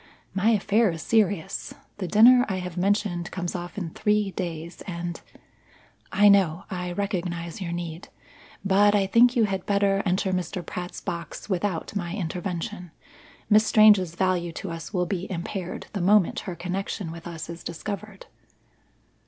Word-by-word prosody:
My 195 Hz, +3 st, +2 dB
affair 215 Hz, 0 st, +3 dB
is 165 Hz, -2 st, -5 dB
serious. 200 Hz, -5 st, 0 dB, 0.2 s
The 185 Hz, -, -2 dB
dinner 240 Hz, +7 st, +7 dB
I 190 Hz, -, -1 dB
have 180 Hz, -2 st, -5 dB
mentioned 185 Hz, -2 st, 0 dB
comes 175 Hz, -2 st, -4 dB
off 175 Hz, +1 st, -6 dB
in 175 Hz, -5 st, -4 dB
three 210 Hz, +1 st, +1 dB
days 170 Hz, -2 st, -5 dB
and 170 Hz, -1 st, -5 dB, 0.5 s
" -, -, -31 dB
"I 205 Hz, +2 st, +5 dB
know. 190 Hz, -3 st, +4 dB
I 180 Hz, -1 st, -3 dB
recognize 175 Hz, -2 st, -3 dB
your 175 Hz, -2 st, -3 dB
need; 170 Hz, 0 st, -5 dB, 0.6 s
but 205 Hz, +2 st, +4 dB
I 200 Hz, -1 st, +3 dB
think 235 Hz, +6 st, +5 dB
you 235 Hz, -, +4 dB
had 195 Hz, -3 st, -1 dB
better 200 Hz, -1 st, +2 dB
enter 185 Hz, 0 st, 0 dB
Mr. 180 Hz, 0 st, -3 dB
Pratt's 180 Hz, +1 st, -6 dB
box 170 Hz, +3 st, -6 dB
without 185 Hz, 0 st, -2 dB
my 175 Hz, -2 st, -3 dB
intervention. 180 Hz, -1 st, -4 dB, 0.6 s
Miss 215 Hz, +1 st, +5 dB
Strange's 205 Hz, -6 st, +5 dB
value 180 Hz, -2 st, 0 dB
to 185 Hz, +2 st, -6 dB
us 165 Hz, -3 st, -7 dB
will 180 Hz, -3 st, 0 dB
be 180 Hz, +1 st, -3 dB
impaired 180 Hz, +1 st, -4 dB
the 200 Hz, -, -2 dB
moment 200 Hz, 0 st, +4 dB
her 175 Hz, -, -4 dB
connection 185 Hz, 0 st, -4 dB
with 165 Hz, +1 st, -9 dB
us 165 Hz, -2 st, -6 dB
is 170 Hz, 0 st, -8 dB
discovered." 200 Hz, +4 st, -6 dB
185 Hz, 160 wpm, -25 LUFS, 175-205 Hz, 0.6 s, dinner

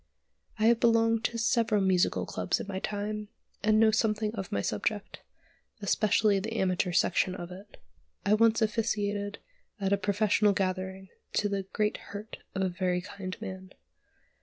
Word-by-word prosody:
I 215 Hz, -, +1 dB
have 230 Hz, 0 st, +5 dB
belonged 230 Hz, -1 st, +3 dB
to 235 Hz, -, -1 dB
several 230 Hz, -2 st, +2 dB
musical 190 Hz, -1 st, +2 dB
clubs -, -, -1 dB
in -, -, -4 dB
my 190 Hz, -2 st, -3 dB
time, 210 Hz, +1 st, -3 dB, 0.3 s
and 215 Hz, +1 st, +4 dB
know 220 Hz, -1 st, +6 dB
something 215 Hz, -1 st, +1 dB
of 195 Hz, -5 st, -5 dB
my 100 Hz, -, 0 dB
subject, 200 Hz, -, -2 dB, 0.6 s
especially 205 Hz, 0 st, +2 dB
the 220 Hz, +4 st, -4 dB
amateur 185 Hz, -1 st, +1 dB
section 185 Hz, +1 st, +2 dB
of 175 Hz, -1 st, -7 dB
it. 195 Hz, +3 st, -12 dB, 0.5 s
I 200 Hz, -, +4 dB
once 225 Hz, +1 st, +4 dB
officiated 205 Hz, -2 st, -1 dB, 0.4 s
at 195 Hz, 0 st, +1 dB
a -, -, +4 dB
professional 205 Hz, +1 st, +2 dB
gathering 190 Hz, 0 st, -2 dB, 0.2 s
to 205 Hz, -, +1 dB
the 195 Hz, -1 st, -2 dB
great 210 Hz, 0 st, 0 dB
hurt 205 Hz, +2 st, -9 dB, 0.2 s
of 190 Hz, -, 0 dB
a -, -, +2 dB
very 180 Hz, 0 st, -1 dB
kind 195 Hz, 0 st, -7 dB
man. 190 Hz, -3 st, -8 dB
205 Hz, 160 wpm, -29 LUFS, 190-215 Hz, 0.6 s, know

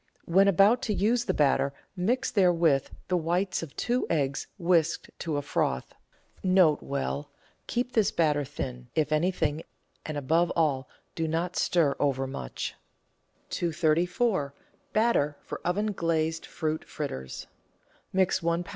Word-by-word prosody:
When 195 Hz, +4 st, +4 dB
about 200 Hz, +6 st, +5 dB
to 215 Hz, -5 st, 0 dB
use 235 Hz, +5 st, +2 dB
the 185 Hz, -, +1 dB
batter 140 Hz, -1 st, +2 dB, 0.2 s
mix 220 Hz, +8 st, 0 dB
therewith 170 Hz, -8 st, +3 dB, 0.2 s
the 180 Hz, -, +1 dB
whites 175 Hz, +3 st, 0 dB
of 165 Hz, -4 st, -8 dB
two 245 Hz, +1 st, 0 dB
eggs 140 Hz, -4 st, 0 dB
whisked 170 Hz, -3 st, +1 dB
to 160 Hz, -3 st, -2 dB
a 145 Hz, -, -2 dB
froth. 65 Hz, -, -1 dB, 0.5 s
N.B. 150 Hz, -6 st, +2 dB, 0.2 s
— -, -, -36 dB
Keep 245 Hz, +1 st, -1 dB
this 215 Hz, -4 st, +3 dB
batter 150 Hz, -3 st, +2 dB
thin, 125 Hz, -3 st, -6 dB
if 155 Hz, -2 st, +1 dB
anything, 160 Hz, -1 st, +1 dB, 0.4 s
and 155 Hz, -1 st, -4 dB
above 165 Hz, +5 st, +2 dB
all 140 Hz, -5 st, +1 dB, 0.2 s
do 165 Hz, -1 st, -2 dB
not 170 Hz, +3 st, -1 dB
stir 160 Hz, -5 st, +2 dB
overmuch. 135 Hz, -, -2 dB, 0.8 s
234— 170 Hz, -, +1 dB, 0.4 s
BATTER 215 Hz, -10 st, +2 dB
FOR -, -, -7 dB
OVEN 205 Hz, +5 st, 0 dB
GLAZED 165 Hz, -3 st, -1 dB
FRUIT 155 Hz, -1 st, -2 dB
FRITTERS 65 Hz, -, -5 dB, 0.7 s
Mix 190 Hz, 0 st, +2 dB
one 170 Hz, +1 st, 0 dB
lb. -, -, -14 dB
165 Hz, 135 wpm, -28 LUFS, 145-185 Hz, 0.8 s, about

